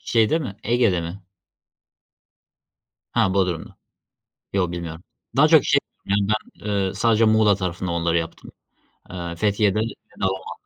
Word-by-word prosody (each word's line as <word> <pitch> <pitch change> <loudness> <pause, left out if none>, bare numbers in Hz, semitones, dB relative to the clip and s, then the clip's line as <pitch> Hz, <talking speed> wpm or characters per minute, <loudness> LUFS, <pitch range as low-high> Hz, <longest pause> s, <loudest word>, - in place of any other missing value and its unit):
Şeyde 115 +7 +2
mi, 120 -11 -5
Ege'de 115 -6 +2
mi? 85 +4 -7 1.9
Ha, 95 - +3
Bodrum'da 90 -4 -1 0.8
Yok 90 -3 +1
bilmiyorum. 85 -1 -6 0.3
Daha - - +7
çok - - +6
şey - - +4 0.3
ya, 100 - +1
ben, 110 +1 -3
eee, 100 -2 0
sadece 115 +2 +3
Muğla 110 -2 +4
tarafında 90 -1 -3
onları 85 0 +1
yaptım. 85 0 -5 0.6
Eee, 85 -1 -5
Fethiye'de 105 +2 +1
ve 110 - +2 0.4
Dalaman'da, 95 -1 -2
95 Hz, 130 wpm, -23 LUFS, 85-110 Hz, 1.9 s, Daha